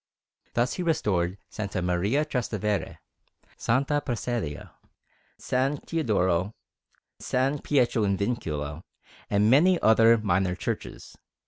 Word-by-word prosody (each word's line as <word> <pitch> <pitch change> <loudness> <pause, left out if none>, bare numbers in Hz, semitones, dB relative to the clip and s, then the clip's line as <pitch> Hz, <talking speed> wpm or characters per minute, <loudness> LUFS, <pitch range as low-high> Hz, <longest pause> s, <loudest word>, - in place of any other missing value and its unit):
Thus 120 +1 +1
he - - -4
restored 95 - 0 0.2
S. 100 -3 -4
Maria 90 +11 +1
Trastevere, 110 -7 -2 0.6
S. - - -10 0.4
Prassedia, 120 - -3 0.7
S. 135 +3 0
Teodoro, 100 - 0 0.6
S. 135 +3 0
Pietro 125 -5 +2
in 100 -1 +1
Vincula, 80 -9 -3 0.5
and 105 +2 +3
many 170 +6 +5
other 115 +1 +6
minor 95 -3 0
churches. - - -5
110 Hz, 100 wpm, -26 LUFS, 95-130 Hz, 0.7 s, other